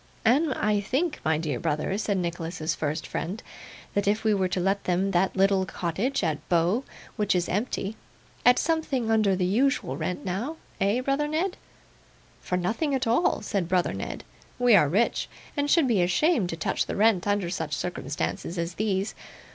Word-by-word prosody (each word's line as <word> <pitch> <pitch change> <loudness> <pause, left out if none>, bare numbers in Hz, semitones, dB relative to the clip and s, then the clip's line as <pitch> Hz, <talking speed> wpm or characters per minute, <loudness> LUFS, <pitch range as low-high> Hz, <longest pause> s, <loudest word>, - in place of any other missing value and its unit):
'And 275 +7 +4
I 210 -1 +1
think, 295 - -1
my 160 -1 +2
dear 150 -6 -2
brother,' 155 +3 -1
said 205 -2 0
Nicholas's 170 -2 -2
first 155 +1 -2
friend, 190 +7 -4 0.5
'that 205 0 0
if 210 +2 +1
we 220 -1 +3
were 190 -2 +1
to 185 - -2
let 195 +2 0
them 185 +2 +1
that 185 +1 +1
little 195 0 +3
cottage 195 +11 -1
at 155 -3 0
Bow 175 +8 +2 0.3
which 210 -3 +1
is 175 -1 +1
empty, 205 0 -2 0.5
at 245 0 +6
something 290 -8 0
under 215 -3 +3
the 180 -1 0
usual 250 +9 +1
rent, 180 - -3
now? 225 - -3 0.2
Eh, 205 +5 +2
brother 275 +3 0
Ned?' 340 +5 -1 0.9
'For 180 - -1
nothing 230 - 0
at 260 - -1
all,' 235 +9 +2
said 190 -5 -1
brother 180 -1 +2
Ned. - - -5 0.3
'We 245 -3 +5
are 150 -7 +5
rich, 210 +9 +1 0.3
and 290 -1 0
should 320 -4 +4
be 220 -7 +3
ashamed 190 - +2
to 165 - -4
touch 155 - -1
the - - -3
rent 210 -3 +3
under 205 -4 0
such 155 -4 -2
circumstances 170 +1 -3
as 170 +1 -2
these. 200 0 -1
195 Hz, 180 wpm, -26 LUFS, 175-240 Hz, 0.9 s, at